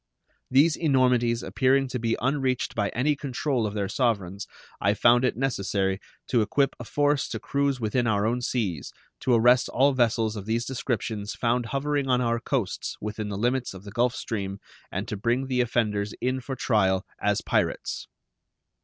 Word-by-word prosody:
These 145 +5 +5
enormities 125 -6 +2
appearing 135 +1 +2
to 125 - -3
be 115 0 0
unreached 130 -1 0
by 105 -2 0
any 145 +5 +1
control 135 -3 -1
of 105 - -6
their 100 -2 -1
sovereigns, 100 -5 -1 0.3
I 100 +2 +3
found 120 +3 +5
it 125 - +1
necessary 100 -7 0 0.3
to 120 -3 +3
equip 135 +5 +1
a 120 - -7
force 145 +2 +1
to - - -4
cruise 140 -1 0
within 120 +2 0
our 105 -2 +2
own 120 +3 0
seas, 100 - -2 0.3
to 125 - +2
arrest 120 +2 +4
all 135 +3 +3
vessels 115 -3 +1
of 105 -1 -7
these 115 +2 0
descriptions 110 -5 -3
found 120 0 0
hovering 140 +1 -1
on 125 -1 +3
our 115 -1 +1
coasts 120 -5 -2
within 105 0 -4
the 100 - -4
limits 125 0 0
of 95 - -10
the 100 - -9
Gulf 120 +2 +1
Stream 100 -3 -4 0.3
and - - -3
to - - -3
bring 120 +6 0
the 130 -1 +1
offenders 105 -4 0
in 130 +1 -1
for 135 +1 -5
trial 95 -7 +1 0.2
as - - +1
pirates. - - -1
120 Hz, 175 wpm, -26 LUFS, 105-130 Hz, 0.3 s, These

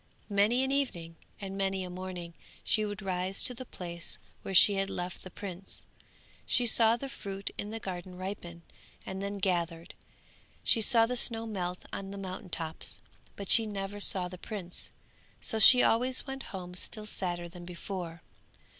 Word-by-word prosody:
Many 210 +6 +4
an 265 - 0
evening 175 -13 -1 0.2
and 195 -2 -5
many 195 -1 0
a 180 - -5
morning 180 -2 -6 0.3
she 215 -1 +2
would 205 -1 -5
rise 185 0 0
to 250 - +3
the 255 +1 -8
place 170 -1 -4 0.2
where 195 - -4
she 205 - +10
had 195 0 0
left 180 0 -4
the 185 - -9
prince. 190 0 -7 0.6
She 245 - +4
saw 225 0 +6
the 275 - -5
fruit 195 -6 -6
in 205 - -4
the 225 +1 -4
garden 185 -2 -6
ripen, 180 -3 -6 0.4
and 190 0 -4
then 200 +1 -3
gathered, 175 -2 -1 0.7
she 225 - +4
saw 225 +1 +6
the 250 +2 -2
snow 230 -2 +2
melt 180 -5 -3
on 195 0 -4
the 200 - -6
mountain 190 0 -6
tops, 160 -1 -3 0.4
but 200 - -6
she 225 +2 +7
never 200 0 -4
saw 185 -2 +1
the 180 0 -9
prince, 185 -5 -6 0.5
so 220 - -2
she 250 +3 +9
always 250 +3 +3
went 270 -1 -5
home 180 -2 -6
still 210 +4 -2
sadder 175 -4 -1
than 175 0 -10
before. 175 -1 -6
195 Hz, 170 wpm, -31 LUFS, 180-215 Hz, 0.7 s, she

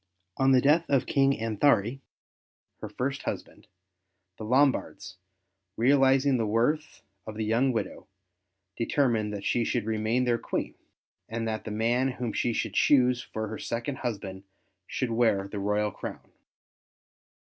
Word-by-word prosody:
On 135 0 +3
the 130 -1 +5
death 155 +5 +4
of 135 -3 +2
King 135 0 +3
Anthari, 115 +1 +1 0.8
her - - -6
first 135 +2 -3
husband, - - -6 0.7
the - - -6
Lombards, 115 -6 +1 0.6
realizing 135 +2 +4
the 115 -2 0
worth 150 +9 0 0.2
of 110 - -6
the 110 0 -2
young 120 +5 +2
widow, 110 -5 -4 0.7
determined 115 -3 0
that 100 -1 -6
she 120 - +1
should 115 -1 -1
remain 110 +3 0
their 120 -1 +1
Queen, - - -3 0.6
and 115 0 -3
that 110 -1 -3
the - - -4
man 120 +5 +1
whom 120 -3 -4
she 120 - 0
should 110 -2 -2
choose 125 -3 +4
for 110 0 -5
her 110 - -6
second 120 +4 -3
husband 100 -6 -4 0.5
should 130 -3 -2
wear 115 -4 +2
the 100 +1 -6
royal 105 +1 0
crown. - - -8
115 Hz, 145 wpm, -28 LUFS, 110-130 Hz, 0.8 s, the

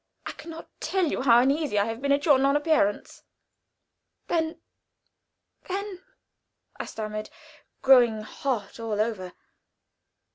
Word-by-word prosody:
I - - -4
can - - -12
not 325 0 -9
tell 380 -2 0
you - - -2
how 240 -2 +6
uneasy 275 -3 +1
I 200 - +3
have 225 +2 -5
been 280 0 0
at 285 +1 +2
your 285 -5 +5
non 275 +1 +3
appearance." 295 -9 0 1.0
"Then 320 -1 -1 1.1
then 390 0 -4 0.4
" - - -35
I - - -6
stammered, 215 -1 -5 0.5
growing 240 -5 +5
hot 225 -2 -4
all 220 -2 -3
over. 210 -5 -2
260 Hz, 135 wpm, -26 LUFS, 215-310 Hz, 1.1 s, how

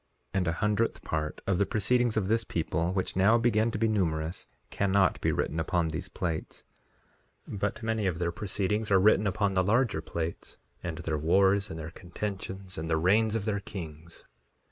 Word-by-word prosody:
3:13 - - 0
And 90 - -1
a - - +2
hundredth 105 +5 0
part 75 -1 -3
of 100 -2 +1
the 100 - +4
proceedings 115 +3 +1
of 100 -4 +1
this 115 +2 +2
people, 85 -2 -1
which 95 0 -2
now 100 +5 +5
began 115 -1 +2
to 110 - -3
be 115 +1 +2
numerous, 85 -6 -1 0.2
cannot 100 -1 +2
be - - +2
written 80 - -1
upon 85 0 0
these 80 +3 -5
plates; 85 -4 -4 0.8
but 105 +3 -3
many 110 -2 0
of 90 -3 -1
their 85 -1 -1
proceedings 105 +3 -1
are 95 -1 +5
written 105 +1 +4
upon 100 0 +1
the 95 -1 +3
larger 110 -3 +2
plates, 85 0 -5 0.2
and 85 -2 -4
their 80 -2 -2
wars, 95 +5 +3
and 80 - -6
their 80 +1 -6
contentions, 95 +1 -6
and 80 +1 -4
the 80 - +2
reigns 105 +6 +3
of 110 -3 -2
their 105 -2 0
kings. 85 -4 -8
95 Hz, 190 wpm, -29 LUFS, 85-105 Hz, 0.8 s, now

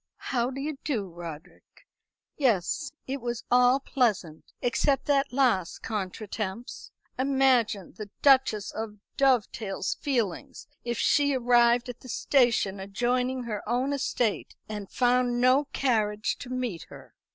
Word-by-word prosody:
"How 245 -2 -1
do 270 +1 -6
you 290 0 -4
do, 225 -10 -2
Roderick? 165 -3 -11 0.5
Yes; 260 - 0
it 270 0 -4
was 240 -1 -4
all 250 +2 +5
pleasant 210 - -1
except 270 +3 +1
that 275 -1 +2
last 245 -10 +1
contretemps. 210 +1 -5 0.3
Imagine 260 -7 +2
the 210 +1 -8
Duchess 260 -7 +4
of 220 -1 -5 0.2
Dovedale's 235 -7 +1
feelings 235 - -3 0.2
if 240 -1 -3
she 285 +2 +3
arrived 240 -1 +4
at 245 -1 -7
the 255 - -13
station 230 -7 +2
adjoining 250 +6 -1
her 215 -4 -4
own 255 +4 0
estate, 245 -5 -1
and 210 -3 -6
found 245 0 +2
no 255 +4 +4
carriage 215 -6 0
to 250 - -8
meet 250 -9 -3
her!" - - -13
245 Hz, 130 wpm, -27 LUFS, 210-260 Hz, 0.5 s, all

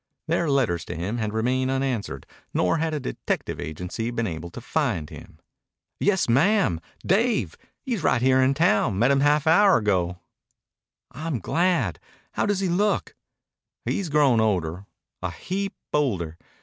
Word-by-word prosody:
Their 165 0 +1
letters 115 - +1
to - - -6
him 95 +8 -3
had 110 -1 -1
remained 125 +4 0
unanswered 130 -6 -2 0.3
nor 90 - +2
had 160 0 0
a - - -1
detective 130 - -3
agency 90 +9 -4
been 115 -1 -2
able 85 -3 -5
to 105 - -9
find 115 - -1
him. - - -12 0.6
"Yes, 190 -3 +2
ma'am, 135 - +3 0.2
Dave! 225 +6 +1 0.3
He's 240 -8 -2
right 130 - +2
here 130 +1 +4
in 130 +1 +3
town. 110 - +2
Met 120 +6 +4
him 140 - +3
half 145 +1 +3
an 160 - +5
hour 200 +2 +6
ago." 90 -5 0 0.9
"I'm 155 +1 -3
glad. 160 - 0 0.3
How - - -1
does 205 -1 0
he 190 - +1
look?" 200 +4 0 0.7
"He's 195 -5 -1
grown 145 -5 +4
older, 95 -3 -1 0.3
a - - -2
heap 195 +1 -4 0.2
older. 95 - 0
130 Hz, 155 wpm, -25 LUFS, 100-165 Hz, 0.9 s, hour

